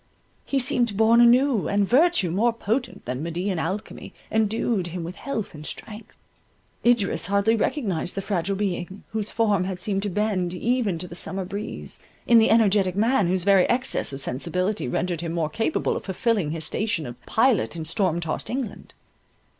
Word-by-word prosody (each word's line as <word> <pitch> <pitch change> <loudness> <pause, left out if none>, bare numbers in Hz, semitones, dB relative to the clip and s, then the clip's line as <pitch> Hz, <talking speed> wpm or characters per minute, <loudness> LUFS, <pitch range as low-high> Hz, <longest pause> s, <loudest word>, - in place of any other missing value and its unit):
He 275 - -1
seemed 240 -5 +1
born 225 +2 +5
anew, 245 -1 +4
and 200 -1 +1
virtue, 275 - +3
more 220 +7 +2
potent 230 +2 -3
than 125 +2 -3
Medean 175 +3 -2
alchemy, 190 +6 -5 0.2
endued 220 -3 0
him 175 0 -5
with 170 +2 -6
health 230 -7 -4
and 150 -1 -9
strength. 215 +7 -8 0.7
Idris 235 -4 +2
hardly 200 +3 +2
recognized 205 - -1
the 195 - -3
fragile 195 -1 -1
being, 190 -1 -3
whose 220 -1 -2
form 210 -5 +1
had 185 -1 -4
seemed 195 +1 0
to 205 - -2
bend 185 -3 -1
even 230 -3 0
to 180 +2 -5
the 170 - -10
summer 190 +2 -3
breeze, 200 +4 -5 0.3
in 235 -1 +6
the 220 - +4
energetic 200 -4 +3
man, 220 -1 +2
whose 180 0 +1
very 195 -1 +4
excess 255 - +1
of 135 - -4
sensibility 180 +9 -1
rendered 170 +6 -2
him 165 -1 -4
more 165 -3 -1
capable 225 - -1
of - - -5
fulfilling 200 -3 0
his 160 0 -4
station 205 -6 -2
of 120 0 -9
pilot 230 - +2
in 160 -1 -5
storm 170 +1 +1
tossed 165 -2 -4
England. 245 -5 -5
200 Hz, 175 wpm, -24 LUFS, 175-225 Hz, 0.7 s, in